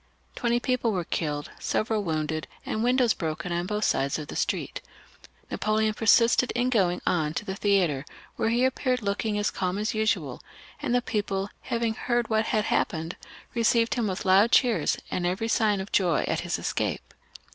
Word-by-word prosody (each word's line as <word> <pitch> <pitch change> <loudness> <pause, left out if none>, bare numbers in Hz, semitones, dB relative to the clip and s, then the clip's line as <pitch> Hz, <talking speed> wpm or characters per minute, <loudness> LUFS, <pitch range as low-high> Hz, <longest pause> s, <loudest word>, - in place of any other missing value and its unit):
Twenty 240 0 +1
people 250 -2 0
were 180 -2 -1
killed, 150 -3 -3
several 215 -1 0
wounded, 155 -2 -2 0.2
and 215 - -2
windows 245 -1 +3
broken 160 +1 -4
on 175 +1 -1
both 210 +1 -2
sides 140 -7 +1
of 150 -2 -7
the - - -6
street. - - -2 0.7
Napoleon 215 +1 +1
persisted 230 +3 +4
in 245 +1 +1
going 180 -6 +1
on 155 -2 0
to 210 - -3
the 190 -2 -4
theatre, 190 -10 +1 0.3
where 225 - 0
he 240 +2 +2
appeared 255 -2 0
looking 205 +1 -1
as 205 0 0
calm 185 0 -2
as 215 +2 -1
usual; 215 0 -1 0.4
and 245 - 0
the 245 - +2
people, 200 -3 -2
having 230 -1 -1
heard 240 +1 0
of - - -14
what 220 0 +2
had 215 -1 0
hap - - +2
pened, 160 +1 -4 0.4
received 230 -1 +2
him 235 -4 0
with 185 -1 -3
loud 195 +5 +5
cheers, 245 -3 +3
and 175 -1 0
every 190 +6 -1
sign 215 -3 +2
of 190 +1 -6
joy 175 -5 +2
at - - 0
his - - -2
escape. - - -3
210 Hz, 185 wpm, -26 LUFS, 180-230 Hz, 0.7 s, loud